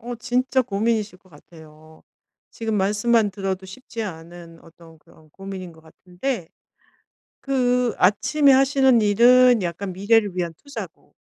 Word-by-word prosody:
어 240 +1 -6
진짜 255 +2 0
고민이실 215 -3 -2
것 185 - -26
같아요. 155 0 -18 0.5
지금 225 -1 -4
말씀만 210 +2 +1
들어도 190 -1 -4
쉽지 225 +3 -8
않은 170 -2 -10
어떤 165 -1 -18
그런 155 0 -23
고민인 190 -1 -9
것 160 - -19
같은데 180 +5 -6 0.9
그 250 -3 0
아침에 275 +10 +3
하시는 265 -2 +3
일은 240 +3 +5
약간 180 +3 -4
미래를 200 0 +1
위한 170 -2 -2
투자고 285 - -11
205 Hz, 280 characters per minute, -22 LUFS, 175-245 Hz, 0.9 s, 일은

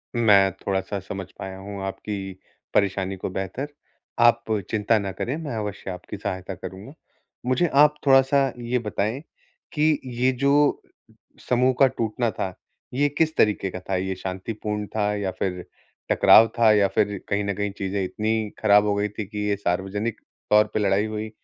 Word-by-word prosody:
मैं 100 -4 +5
थोड़ा-सा 95 +1 -3
समझ 95 0 -6
पाया 95 0 -6
हूँ 100 0 -7
आपकी 95 -1 -5 0.4
परेशानी 95 -1 +1
को 95 - -4
बेहतर, 95 +9 -4 0.5
आप 120 0 +5 0.3
चिंता 110 +1 +2
ना 100 -1 -3
करें 120 - -3
मैं 140 -6 -4
अवश्य 105 -3 -5
आपकी 90 +3 -8
सहायता 95 -2 -4
करूँगा। 95 - -9 0.5
मुझे 130 +7 +2
आप 150 +1 +6
थोड़ा-सा 135 0 +5
ये 120 +1 -1
बताएँ, 110 +4 -2 0.5
कि 155 -1 +2
ये 125 +1 +1
जो 140 +3 +2 0.7
समूह 125 +1 +3
का 135 - +8
टूटना 115 -2 -1
था, 95 -2 -4 0.4
ये 145 +2 +3
किस 160 +2 0
तरीके 105 -3 +2
का 90 - -7
था, 95 +1 -2
ये 95 +1 -2
शांतिपूर्ण 105 +3 -4
था 105 -1 +1
या 100 -2 -2
फिर 90 -2 -2 0.5
टकराव 115 - +7
था 115 -2 +6
या 100 -2 +4
फिर 100 0 0
कहीं 100 0 0
न 100 -1 -1
कहीं 105 +1 -2
चीज़ें 95 0 -2
इतनी 110 +3 -1
खराब 105 -1 +5
हो 100 - +2
गई 105 +1 0
थी 105 +1 -5
कि 105 0 -8
ये 100 - +1
सार्वजनिक 95 +4 -2 0.3
तौर 105 0 +6
पे 110 - +1
लड़ाई 100 +1 +2
हुई? 110 0 -4
105 Hz, 170 wpm, -24 LUFS, 95-120 Hz, 0.7 s, का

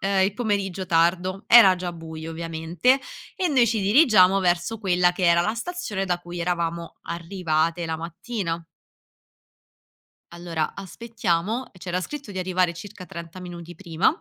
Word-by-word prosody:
ehm, 195 0 +2
il 195 - 0
pomeriggio 200 -5 -2
tardo 180 +3 +1
era 205 -6 +8
già 175 -1 -4
buio, 160 -1 -8
ovviamente, 165 - 0 0.4
e 365 -2 0
noi 260 -5 +4
ci 220 -3 0
dirigiamo 195 - +5
verso 180 +5 0
quella 180 -3 +2
che 180 0 -2
era 170 0 +5
la 215 - 0
stazione 235 - -4
da 175 -1 0
cui 175 0 -8
eravamo 170 -1 -2
arrivate 170 -1 -1
la 160 -1 -3
mattina. 170 -1 -4 1.7
Allora 170 -2 -3
aspettiamo, 215 +1 -3
e 185 - -17
c'era 180 0 -3
scritto 285 -4 -7
di 190 - -5
arrivare 180 -1 +1
circa 185 +1 -10
30 170 +2 -9
minuti 175 -1 -9
prima. 170 -1 -2
180 Hz, 150 wpm, -24 LUFS, 170-200 Hz, 1.7 s, era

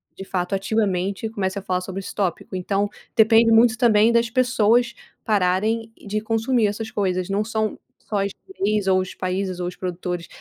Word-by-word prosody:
de 195 - -8
fato 185 +1 -2
ativamente 200 0 -1
comece 200 -2 -2
a - - -9
falar 185 -2 -1
sobre 190 +1 -5
esse - - -8
tópico. 190 -1 -2
Então, 195 +2 -1 0.3
depende 225 +1 +5
muito 225 +1 +5
também 220 -1 +4
das 235 0 +2
pessoas 240 -1 +2 0.3
pararem 215 +3 +1 0.2
de 210 +1 -1
consumir 225 +2 +1
essas 220 +2 -4
coisas, 185 -3 -1
não 200 +2 +1
são 220 -1 -2 0.3
só 200 -2 0 0.7
os 185 0 -2
países 185 0 -2
ou 175 - -2
os 180 - -6
produtores, 180 -1 -4
205 Hz, 160 wpm, -22 LUFS, 185-225 Hz, 0.7 s, depende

